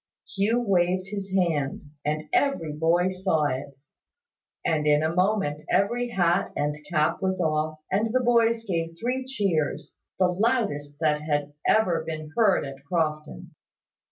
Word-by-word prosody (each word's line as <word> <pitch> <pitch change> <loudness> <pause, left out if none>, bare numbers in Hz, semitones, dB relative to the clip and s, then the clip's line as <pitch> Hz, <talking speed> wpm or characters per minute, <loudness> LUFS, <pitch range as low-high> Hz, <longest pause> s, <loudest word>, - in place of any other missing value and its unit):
Hugh 210 +5 +2
waved 185 -3 +1
his 200 -1 -5
hand; 155 -6 -1
and 155 +1 -2
every 170 - +1
boy 170 +4 +2
saw 185 -4 0
it; 140 0 -3 0.9
and 155 -2 +1
in 150 +1 +4
a 160 +1 0
moment 180 -5 +1
every 240 +5 +1
hat 175 -4 +1
and 150 0 -1
cap 155 -1 +1
was 190 -1 0
off, 155 -2 0
and 215 +4 +1
the 255 - +3
boys 230 -1 +3
gave 165 -4 -2
three 250 +3 -1
cheers, 195 - -1 0.2
the 185 - +4
loudest 180 - 0
that 150 -1 +2
had 145 -1 -1
ever 180 -7 +3
been 155 -1 -6
heard 215 -9 +3
at 135 0 -9
Crofton. 155 -1 -2
170 Hz, 145 wpm, -26 LUFS, 150-200 Hz, 0.9 s, in